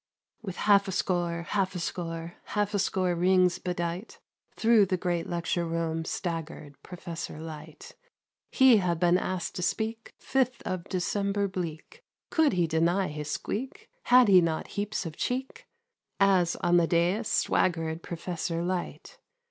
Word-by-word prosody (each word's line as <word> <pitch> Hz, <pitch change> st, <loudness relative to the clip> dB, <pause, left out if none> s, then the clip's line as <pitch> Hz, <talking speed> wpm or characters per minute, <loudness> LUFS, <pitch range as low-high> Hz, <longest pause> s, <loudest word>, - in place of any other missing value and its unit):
With 195 Hz, -5 st, -6 dB
half 200 Hz, 0 st, +4 dB
a -, -, -2 dB
score, 175 Hz, -2 st, -1 dB
Half 195 Hz, -2 st, 0 dB
a -, -, -2 dB
score, 165 Hz, -1 st, -4 dB
Half 210 Hz, -1 st, -1 dB
a 205 Hz, -, +1 dB
score 185 Hz, -1 st, +1 dB
rings 180 Hz, 0 st, +3 dB
bedight, 175 Hz, +3 st, -4 dB, 0.4 s
Through 225 Hz, -3 st, +4 dB
the 185 Hz, 0 st, 0 dB
great 175 Hz, -1 st, -2 dB
lecture 170 Hz, 0 st, -1 dB
room 165 Hz, -1 st, -2 dB
Staggered 165 Hz, -4 st, -4 dB
Professor 170 Hz, -4 st, -7 dB
Light. 155 Hz, -1 st, -10 dB, 0.5 s
He 260 Hz, -3 st, +6 dB
had 175 Hz, -4 st, 0 dB
been 175 Hz, +1 st, +4 dB
asked 185 Hz, -2 st, -3 dB
to -, -, -3 dB
speak 220 Hz, +5 st, -2 dB
Fifth 255 Hz, -2 st, 0 dB
of 185 Hz, -1 st, -3 dB
December 200 Hz, +2 st, -1 dB
bleak, 185 Hz, -, -6 dB, 0.3 s
Could 315 Hz, -6 st, +3 dB
he 175 Hz, -2 st, +2 dB
deny 170 Hz, +4 st, +1 dB
his 150 Hz, 0 st, -6 dB
squeak? 270 Hz, -, -5 dB
Had 250 Hz, -1 st, +6 dB
he 185 Hz, -3 st, +7 dB
not 165 Hz, -2 st, -2 dB
heaps 205 Hz, -1 st, -3 dB
of 160 Hz, -2 st, -6 dB
cheek? 265 Hz, -, -3 dB, 0.5 s
As 190 Hz, -3 st, +3 dB
on 175 Hz, 0 st, +2 dB
the 170 Hz, -1 st, +3 dB
dais 180 Hz, +7 st, +1 dB
Swaggered 165 Hz, -2 st, +1 dB
Professor 170 Hz, 0 st, -4 dB
Light. 180 Hz, 0 st, -4 dB
180 Hz, 150 wpm, -28 LUFS, 170-200 Hz, 0.5 s, he